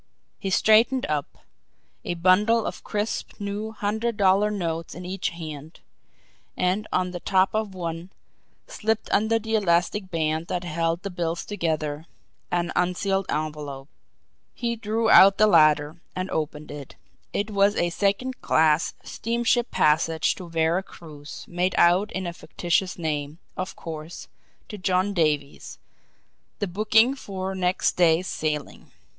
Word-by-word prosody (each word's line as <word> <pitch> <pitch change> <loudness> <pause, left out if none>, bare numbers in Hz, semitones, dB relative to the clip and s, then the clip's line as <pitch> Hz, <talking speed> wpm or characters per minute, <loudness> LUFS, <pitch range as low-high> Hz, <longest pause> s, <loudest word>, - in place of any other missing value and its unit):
He 195 - -3
straightened 225 +6 +4
up, 150 -2 -4 0.6
a 175 - -3
bundle 205 +6 +3
of - - -5
crisp 210 +2 -3
new 205 +2 -4
hundred 220 +1 -2
dollar 200 +1 +4
notes 165 -5 -3
in 180 +1 -8
each 185 +1 -2
hand 155 -2 -9 0.8
and 185 +4 0
on 180 0 0
the 175 - -5
top 190 +1 +2
of 215 -3 -2
one, 170 0 -5 0.6
slipped 220 0 -2
under 220 +2 +3
the 225 0 -5
elastic 185 -1 +1
band 160 -1 -1
that 180 - -2
held 165 +1 -1
the 200 - -4
bills 170 -1 -3
together, 160 -5 -2 0.4
an 175 0 -1
unsealed 195 +2 0
envelope. 150 -2 -4 0.7
He 235 -1 -2
drew 225 +1 -1
out 195 +1 +8
the 215 - +6
latter, 155 -3 +4
and 185 +1 -3
opened 150 -1 -3
it 145 -2 -9 0.4
it 205 +2 -2
was 200 +1 +3
a 175 0 0
second 205 +8 -1
class 155 0 +2
steamship 235 +1 0
passage 160 +1 +2
to 180 -3 -10
Vera 165 +2 +1
Cruz, 150 -6 -11
made 180 +1 -1
out 180 +5 +4
in 190 0 -3
a 175 - -4
fictitious 175 +2 -1
name, 150 -2 -3 0.2
of 185 +1 -4
course, 160 0 -8 0.4
to 210 - -8
John 185 +2 +1
Davies, 150 -5 -1 0.8
the 205 - -1
booking 215 +6 +3
for 195 -7 -5
next 185 -1 +1
day's 170 0 +4
sailing. 150 -4 -4
180 Hz, 140 wpm, -25 LUFS, 160-205 Hz, 0.8 s, out